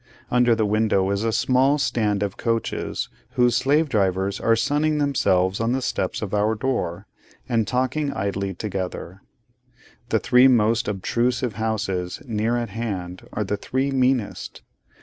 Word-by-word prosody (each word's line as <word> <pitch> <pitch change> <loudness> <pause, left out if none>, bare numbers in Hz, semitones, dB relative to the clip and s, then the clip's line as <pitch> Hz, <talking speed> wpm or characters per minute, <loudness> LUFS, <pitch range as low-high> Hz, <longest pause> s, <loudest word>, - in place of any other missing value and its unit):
Under 125 -1 +4
the 110 -1 +1
window 105 -2 +1
is 100 +2 -1
a 115 - +1
small 130 +4 +3
stand 105 -7 0
of 100 -2 -3
coaches, 115 -1 -2 0.3
whose 120 -1 +3
slave 145 +6 +2
drivers 95 -4 0
are 115 - +3
sunning 150 +6 +1
themselves 95 -10 +1
on 115 +2 0
the 130 - -1
steps - - -2
of 100 - -5
our 105 +2 +2
door, 110 -8 -2 0.4
and 115 -4 +1
talking 130 +5 0
idly 100 -1 -3
together. 95 -2 -5 0.9
The 110 - +3
three 125 +3 +5
most 115 -2 +3
obtrusive 120 +5 -1
houses 100 -5 -2
near 115 0 0
at 120 -2 -3
hand 95 -5 -5
are 105 - -2
the 105 +1 -2
three 130 +6 -1
meanest. 130 -4 -1
115 Hz, 150 wpm, -23 LUFS, 100-125 Hz, 0.9 s, three